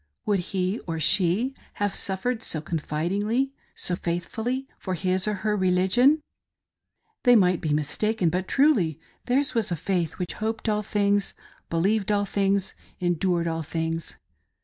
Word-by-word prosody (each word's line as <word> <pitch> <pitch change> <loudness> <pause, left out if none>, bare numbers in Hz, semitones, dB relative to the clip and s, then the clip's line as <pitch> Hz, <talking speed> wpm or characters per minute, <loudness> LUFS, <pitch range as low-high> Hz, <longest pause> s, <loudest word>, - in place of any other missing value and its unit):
Would 205 -2 +2
he 190 +3 -1
or 165 -1 -2
she 190 - +2 0.2
have 205 -1 -1
suffered 220 +5 0
so 160 - -1
confid 155 +1 -2
ingly— 225 +7 0 0.2
so 180 - +1
faithfully 220 +11 -3
— - - -38
for 185 -2 -3
his 185 +2 0
or 210 - +1
her 210 -1 +2
religion 190 +9 +4
.■' - - -24 1.0
They 245 -1 +6
might 180 -5 +4
be 155 - -1
mistaken; 170 +6 +1
but 180 +2 -1
truly 210 - +3 0.3
theirs 260 +1 +2
was 225 -6 +1
a - - +1
faith 170 -1 -1
which 180 - -4
"hoped 220 +1 -3
all 210 -1 +2
things, 205 -1 +1 0.3
believed 195 +5 +1
all 205 0 +2
things, 195 -1 0 0.3
endured 175 -1 +1
all 165 -1 -1
things." 165 +1 -3
190 Hz, 155 wpm, -26 LUFS, 170-215 Hz, 1.0 s, They